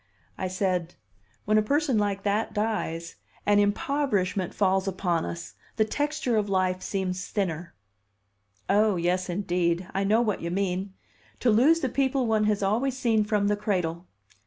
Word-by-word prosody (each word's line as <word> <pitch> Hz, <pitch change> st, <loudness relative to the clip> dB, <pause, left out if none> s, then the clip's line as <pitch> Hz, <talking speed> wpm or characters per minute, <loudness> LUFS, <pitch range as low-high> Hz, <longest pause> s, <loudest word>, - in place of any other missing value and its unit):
I 190 Hz, -, -3 dB
said: 185 Hz, -2 st, -1 dB, 0.5 s
"When 215 Hz, +1 st, +4 dB
a -, -, +3 dB
person 275 Hz, +1 st, +1 dB
like 200 Hz, -1 st, -1 dB
that 210 Hz, +3 st, 0 dB
dies, 190 Hz, -, -2 dB, 0.3 s
an 205 Hz, 0 st, +4 dB
impoverishment 205 Hz, -4 st, 0 dB
falls 190 Hz, -1 st, +1 dB
upon 180 Hz, -3 st, 0 dB
us; 170 Hz, -, -6 dB, 0.2 s
the 215 Hz, -, +3 dB
texture 290 Hz, 0 st, -1 dB
of 210 Hz, -1 st, 0 dB
life 185 Hz, -1 st, +1 dB
seems 185 Hz, -2 st, -3 dB
thinner." 175 Hz, -, -3 dB, 0.9 s
"Oh, 210 Hz, 0 st, +3 dB
yes, 180 Hz, +2 st, 0 dB
indeed! 175 Hz, -1 st, 0 dB
I 195 Hz, -, 0 dB
know 215 Hz, +4 st, +3 dB
what 215 Hz, -4 st, -1 dB
you 170 Hz, -, -3 dB
mean 190 Hz, +1 st, -2 dB, 0.5 s
to 245 Hz, -, +4 dB
lose 290 Hz, +10 st, +4 dB
the 265 Hz, -, +1 dB
people 265 Hz, 0 st, +1 dB
one 220 Hz, -2 st, +2 dB
has 210 Hz, -1 st, +1 dB
always 240 Hz, +7 st, 0 dB
seen 225 Hz, -4 st, +2 dB
from 210 Hz, -1 st, +1 dB
the 205 Hz, -, +2 dB
cradle. 180 Hz, -4 st, -2 dB
200 Hz, 160 wpm, -27 LUFS, 185-220 Hz, 0.9 s, When